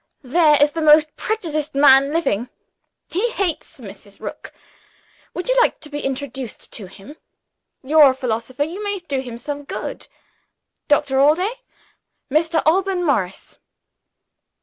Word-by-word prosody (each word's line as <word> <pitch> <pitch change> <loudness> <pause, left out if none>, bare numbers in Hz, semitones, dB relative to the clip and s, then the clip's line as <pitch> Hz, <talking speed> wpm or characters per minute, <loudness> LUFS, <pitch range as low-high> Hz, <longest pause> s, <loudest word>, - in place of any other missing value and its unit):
"There 300 +3 +4
is 290 +1 +4
the 325 - -4
most 305 0 +5
prejudiced 315 -10 -3
man 275 0 +6
living 250 -8 -1 0.6
he 410 +8 0
hates 380 -8 -3
Mrs. - - -12
Rook. - - -8 0.8
Would 360 - -4
you - - +2
like - - +1
to 305 - -10
be 290 - -4
introduced 270 -3 -6
to 205 -5 -7
him? 210 +11 -14 0.7
You're 295 +1 +6
a 260 - -1
philosopher; 250 +1 -2
you 350 +7 -6
may 405 -1 -2
do 290 -7 -4
him 245 -3 -8
some 290 +4 -6
good. - - -6 0.8
Doctor 290 -2 +2
Allday 345 - +3 0.8
Mr. 320 +2 +1
Alban 365 +2 +1
Morris." 195 - -2
295 Hz, 135 wpm, -20 LUFS, 265-330 Hz, 0.8 s, man